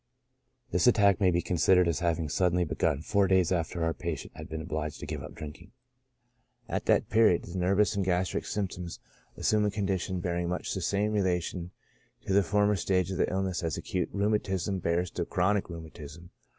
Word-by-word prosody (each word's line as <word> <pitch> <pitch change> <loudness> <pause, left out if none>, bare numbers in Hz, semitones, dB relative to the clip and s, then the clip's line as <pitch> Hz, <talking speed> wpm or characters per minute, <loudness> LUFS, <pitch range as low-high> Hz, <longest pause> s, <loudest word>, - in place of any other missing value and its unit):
— - - -44
This 90 +4 +2
attack 100 -4 +4
may 95 - +5
be 85 0 +1
considered 90 +1 +3
as 85 - 0
having 85 -3 0
suddenly 90 +2 +2
begun 75 -1 0
four 100 0 +2
days 95 -2 +3
after 85 -1 -1
our 80 0 +1
patient 85 -4 -5
had - - -9
been 80 - -4
obliged 75 -2 -4
to - - -6
give - - -5
up - - -9
drink 75 -1 -8
ing. - - -17 0.9
At - - -3
that - - +2
period, 110 -5 +4
the 90 +2 -5
nervous 100 +4 +2
and 100 - 0
gastric 90 0 0
symptoms 90 -4 -4 0.4
as - - -5
sumed 105 -1 +3
a - - +2
condition 95 -3 -2
bearing 85 -1 -2
much 90 - -2
the 95 - -3
same 100 +4 0
relation 90 -3 -1 0.6
to 95 - -1
the 100 - +6
former 105 +2 +2
stage 90 0 0
of 95 - -3
the - - +1
illness 95 -1 -1
as 80 -4 -2
acute 90 -2 -2
rheumatism 100 -2 0
bears 85 +1 0
to 90 - -2
chronic 95 +4 0
rheumatism. 80 0 -10
90 Hz, 195 wpm, -29 LUFS, 85-100 Hz, 0.9 s, the